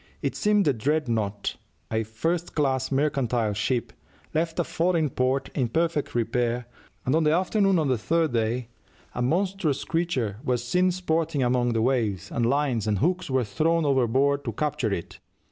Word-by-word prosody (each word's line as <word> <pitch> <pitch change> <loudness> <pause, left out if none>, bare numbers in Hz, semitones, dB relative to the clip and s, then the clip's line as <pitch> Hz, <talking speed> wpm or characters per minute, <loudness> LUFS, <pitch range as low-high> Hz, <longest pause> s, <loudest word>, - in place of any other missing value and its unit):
It - - -1
seems 210 -2 +2
the 145 - +3
Dreadnought, 115 -6 -1 0.3
a 110 0 +1
first 160 +11 -2
class 135 -3 0
mercantile 130 -6 +1
ship, 115 +4 -1 0.4
left 160 +1 -1
a 175 - +2
foreign 165 -3 0
port 130 +2 0
in 130 -4 0
perfect 160 +1 0
repair, 120 0 0 0.4
and 130 - +1
on 160 +1 +3
the 150 - +3
afternoon 190 +3 +2
of 155 -3 +1
the 130 -4 +1
third 165 +3 +1
day 115 +1 -1 0.4
a - - -3
"monstrous 175 +1 0
creature" 135 - -1
was 125 -1 0
seen 180 +9 +2
sporting 165 -5 0
among 120 -1 +2
the 110 -1 +1
waves, 115 -8 0
and 120 -1 +1
lines 130 -5 +1
and 105 -1 +1
hooks 180 - 0
were 130 -1 +2
thrown 160 +10 +1
overboard 135 +1 +2
to 115 - -2
capture 135 -5 -1
it. 85 -4 -5
135 Hz, 165 wpm, -26 LUFS, 120-165 Hz, 0.4 s, the